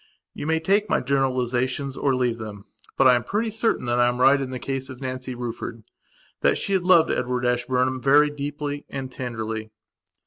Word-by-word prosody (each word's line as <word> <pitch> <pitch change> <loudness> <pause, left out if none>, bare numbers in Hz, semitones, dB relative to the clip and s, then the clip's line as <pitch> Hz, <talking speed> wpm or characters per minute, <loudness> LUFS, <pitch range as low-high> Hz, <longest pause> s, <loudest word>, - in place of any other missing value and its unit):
You 145 - -6
may 160 0 +2
take 200 +6 +1
my - - +3
generalizations 130 0 0
or 135 -1 +1
leave 120 -2 0
them. 105 -2 -8 0.3
But 135 - +4
I 125 - +7
am 120 -1 +1
pretty 220 +2 -1
certain 225 - 0
that 120 0 +1
I 120 - +5
am 120 0 -1
right 135 +2 +5
in 135 - -3
the 130 - -4
case 135 +1 -4
of 130 -2 -9
Nancy 130 -1 -5
Ruffordthat 120 -2 -4
she 200 - -2
had 185 -2 +1
loved 170 -3 +5
Edward 125 0 -1
Ashburnham 125 +1 0
very 145 +3 +5
deeply 145 0 -4
and 135 -2 -5
tenderly. 110 -3 -5
130 Hz, 185 wpm, -24 LUFS, 120-145 Hz, 0.3 s, I